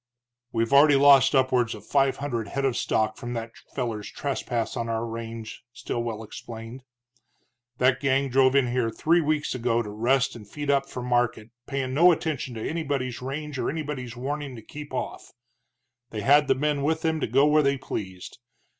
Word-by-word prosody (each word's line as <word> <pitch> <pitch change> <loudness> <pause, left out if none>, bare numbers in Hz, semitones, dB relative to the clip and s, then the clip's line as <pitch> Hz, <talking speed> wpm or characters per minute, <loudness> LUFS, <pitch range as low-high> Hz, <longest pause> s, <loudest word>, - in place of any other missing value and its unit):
"We've 115 +3 0
already 145 +1 +7
lost 140 0 +6
upwards 125 -3 +2
of - - -12
five 135 -2 +2
hundred 120 -6 -3
head 140 +6 -2
of 130 -3 +1
stock 110 0 0
from 120 0 -5
that 115 -1 -4 0.2
feller's 115 -5 -3
trespass 120 -4 -3
on 115 -2 -3
our 115 0 -1
range," 115 -1 -7
Stilwell 115 -2 -4
explained. 115 +3 -9 1.0
"That 125 +1 +3
gang 135 0 +1
drove 130 +1 +4
in 130 -3 +3
here 120 -2 +1
three 165 +9 +2
weeks 150 -1 0
ago 120 -2 0
to 105 - -7
rest 125 +5 +1
and 105 -4 -11
feed 145 +2 -2
up 140 -1 +1
for 125 - -6
market, 120 -2 0 0.2
payin' 135 -2 -2
no 170 +6 +6
attention 150 -7 -2
to 110 - -4
anybody's 140 -7 -2
range 140 +1 -5
or - - 0
anybody's 140 -6 -5
warning 140 +1 -4
to 115 - -10
keep 150 +5 -9
off. - - -5 0.8
They 110 - -5
had 145 +3 +5
the 135 - +3
men 145 +1 0
with 160 +3 0
them 160 -1 +1
to - - -1
go 135 +6 +4
where 150 +1 +5
they 140 -1 +2
pleased. 95 -6 -6
130 Hz, 180 wpm, -26 LUFS, 115-145 Hz, 1.0 s, already